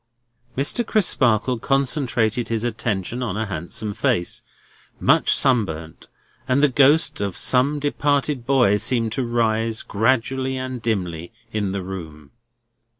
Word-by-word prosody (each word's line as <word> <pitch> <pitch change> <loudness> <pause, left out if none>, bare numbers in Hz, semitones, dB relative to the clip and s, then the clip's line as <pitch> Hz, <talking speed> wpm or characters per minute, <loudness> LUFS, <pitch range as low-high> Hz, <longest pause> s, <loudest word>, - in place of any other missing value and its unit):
Mr. 145 - +1
Crisparkle 125 - +2
concentrated 125 -4 0
his 115 -1 -2
attention 115 -1 -2
on 110 -5 -3
a 110 - -1
handsome 95 +3 -4
face, 85 -3 -1 0.6
much - - +3
sunburnt; 85 - 0 0.4
and 135 +2 +2
the - - +7
ghost 140 0 +3
of 100 -3 -3
some 135 +4 +2
departed 145 -2 0
boy 125 -6 +3
seemed 115 0 0
to 130 - -1
rise, 115 -1 0
gradually 130 +4 0
and 130 -1 -5
dimly, 90 -6 -3 0.2
in 105 -3 -2
the 95 -1 -3
room. 80 -6 -8
115 Hz, 125 wpm, -22 LUFS, 100-130 Hz, 0.6 s, the